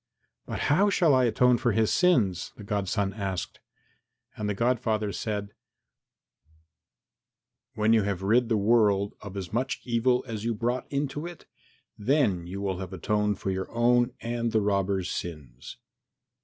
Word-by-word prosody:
"But - - -4
how 190 +9 +3
shall 170 -6 +3
I 130 -1 +4
atone 125 +1 +3
for 120 -3 +1
his 110 +1 +2
sins?" 115 - +2
the 105 - -10
godson 100 0 -1
asked. 95 -3 -4 0.8
And 105 -1 -3
the 105 - -1
godfather 110 -2 0
said, 105 -1 -4 2.2
"When 110 +1 +3
you 110 - +5
have 100 -2 -2
rid 115 +4 +3
the 110 - +2
world 105 -2 +3
of 100 -1 -8
as 95 -1 -6
much 130 +4 -1
evil 125 +1 +1
as 110 -3 -5
you 115 0 -1
brought 120 +3 -2
into 145 +3 -2
it, 175 -1 -11 0.5
then 105 - +1
you 95 +2 -6
will 95 -2 -2
have 95 -1 -6
atoned 105 +3 0
for 95 - -3
your 95 0 -4
own 120 +1 +3
and 115 0 -2
the 110 - +2
robber's 100 -2 0
sins." 75 - -7
105 Hz, 155 wpm, -27 LUFS, 100-120 Hz, 2.2 s, you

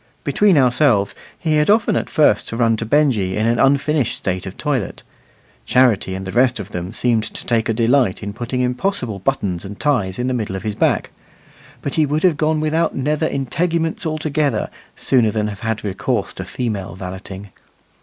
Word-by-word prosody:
Between 205 -5 +3
ourselves, 125 -5 +3 0.2
he 155 -2 0
had 150 +3 +2
often 210 0 +3
at - - -1
first 155 -4 +3
to 115 - -4
run 115 -2 +3
to 115 - -4
Benjy 115 -10 +2
in 110 - +1
an 115 +1 +2
unfinished 140 -1 +2
state 95 0 -3
of 95 - -8
toilet. 135 - -2 0.6
Charity 115 -7 +3
and 95 0 -5
the 95 - -5
rest 125 +1 +2
of 100 0 -7
them 90 0 -4
seemed 115 0 +1
to - - -7
take 115 -1 +1
a - - +2
delight 115 -3 +2
in 100 0 -4
putting 120 +3 -3
impossible 125 - -1
buttons 95 -7 -1
and 100 +1 -8
ties 110 -11 0
in 125 - -2
the 130 - 0
middle 110 -5 -2
of 95 - -5
his 105 - -2
back; - - +1 0.7
but 140 - -3
he 155 -2 +2
would 150 +2 -1
have 180 -4 +4
gone 155 +1 +1
without 155 +2 0
nether 150 +4 0
integuments 165 +5 -1
altogether, 155 -6 -1 0.2
sooner 120 -5 +2
than 105 0 -1
have 100 -2 -7
had 115 -1 -3
recourse 100 -2 -2
to - - -6
female 105 -7 -4
valeting. 95 +1 -8
120 Hz, 190 wpm, -19 LUFS, 105-150 Hz, 0.7 s, have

